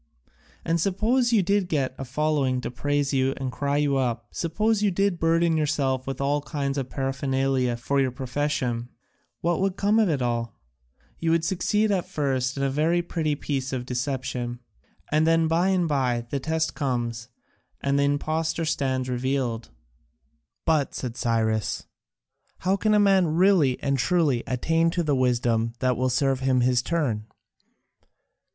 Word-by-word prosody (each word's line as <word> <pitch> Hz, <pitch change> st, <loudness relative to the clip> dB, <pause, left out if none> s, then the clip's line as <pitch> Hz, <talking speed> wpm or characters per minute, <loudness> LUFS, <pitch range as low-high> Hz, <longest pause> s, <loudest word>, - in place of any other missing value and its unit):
And 165 Hz, 0 st, +1 dB
suppose 230 Hz, +7 st, +1 dB
you 215 Hz, -5 st, +4 dB
did 195 Hz, +1 st, +1 dB
get 135 Hz, -6 st, 0 dB
a 135 Hz, -, -6 dB
following 135 Hz, -1 st, 0 dB
to -, -, -4 dB
praise 145 Hz, +3 st, -1 dB
you 135 Hz, 0 st, +1 dB
and 130 Hz, -2 st, -3 dB
cry 140 Hz, +2 st, -1 dB
you 145 Hz, -2 st, +2 dB
up, 120 Hz, -4 st, -2 dB
suppose 210 Hz, +6 st, 0 dB
you 210 Hz, -, +3 dB
did 195 Hz, -1 st, 0 dB
burden 165 Hz, 0 st, +2 dB
yourself 140 Hz, -4 st, 0 dB
with 135 Hz, -1 st, -4 dB
all 145 Hz, +1 st, +1 dB
kinds 140 Hz, -2 st, -2 dB
of 130 Hz, -1 st, -4 dB
paraphernalia 135 Hz, -2 st, 0 dB
for 140 Hz, +4 st, 0 dB
your 130 Hz, -, +2 dB
profession, 125 Hz, -2 st, -2 dB, 0.5 s
what 170 Hz, +1 st, 0 dB
would 195 Hz, -1 st, 0 dB
come 210 Hz, +3 st, +3 dB
of 215 Hz, -4 st, +3 dB
it 150 Hz, -4 st, 0 dB
all? 120 Hz, -3 st, -2 dB, 0.6 s
You 165 Hz, 0 st, +2 dB
succeed 210 Hz, +4 st, +1 dB
at 185 Hz, -3 st, 0 dB
first 135 Hz, -3 st, -1 dB
in 140 Hz, -, -1 dB
a 135 Hz, -, +2 dB
very 165 Hz, +5 st, +1 dB
pretty 155 Hz, -3 st, -1 dB
piece 135 Hz, -2 st, -3 dB
of 125 Hz, -2 st, -3 dB
deception, 125 Hz, -1 st, -3 dB, 0.5 s
and 155 Hz, +1 st, +3 dB
then 165 Hz, 0 st, +3 dB
by 165 Hz, +3 st, +2 dB
and 185 Hz, -3 st, +2 dB
by 125 Hz, -5 st, 0 dB
the 140 Hz, -, -1 dB
test 160 Hz, +3 st, -1 dB
comes, 120 Hz, -5 st, -2 dB, 0.5 s
and 140 Hz, 0 st, +1 dB
the -, -, +3 dB
impostor 155 Hz, +3 st, 0 dB
stands 130 Hz, -4 st, -1 dB
revealed." 125 Hz, -2 st, -2 dB, 1.0 s
"But," 150 Hz, -4 st, +1 dB
said 120 Hz, -3 st, -4 dB
Cyrus, 110 Hz, -4 st, 0 dB, 0.8 s
"how 190 Hz, +2 st, +2 dB
can 215 Hz, +1 st, +2 dB
a -, -, +5 dB
man 190 Hz, -6 st, +3 dB
really 175 Hz, -8 st, +4 dB
and 140 Hz, -1 st, +1 dB
truly 140 Hz, -3 st, +2 dB
attain 165 Hz, +6 st, +1 dB
to 170 Hz, +1 st, -1 dB
the 150 Hz, -3 st, +1 dB
wisdom 120 Hz, -3 st, +1 dB
that 125 Hz, 0 st, +1 dB
will 130 Hz, +2 st, 0 dB
serve 135 Hz, +1 st, +1 dB
his 130 Hz, -2 st, +2 dB
turn?" 125 Hz, -9 st, -1 dB
140 Hz, 160 wpm, -25 LUFS, 130-165 Hz, 1.0 s, a